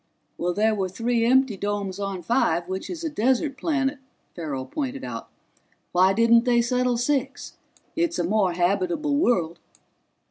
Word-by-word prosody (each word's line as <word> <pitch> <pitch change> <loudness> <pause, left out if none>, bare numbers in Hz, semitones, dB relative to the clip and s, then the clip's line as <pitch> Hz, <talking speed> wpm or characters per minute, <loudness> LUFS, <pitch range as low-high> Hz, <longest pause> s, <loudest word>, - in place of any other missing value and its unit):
"There 220 +1 +2
were 195 -3 -1
three 230 +4 0
empty 260 -2 +3
domes 200 -1 -3
on 195 -3 -4
Five, 170 -5 +1
which 190 +1 -5
is 340 -2 -6
a - - -1
desert 265 +2 +1
planet," 275 -1 -1 0.4
Farrell 145 -6 -4
pointed 275 - -4
out. 115 -2 -6 0.6
"Why 185 +2 +4
didn't 230 +2 +4
they 240 -1 +3
settle 250 0 +1
Six? 270 +2 -2 0.4
It's 340 0 0
a - - 0
more 190 0 +1
habitable 185 - 0
world." 180 - +1
230 Hz, 145 wpm, -24 LUFS, 185-265 Hz, 0.6 s, Why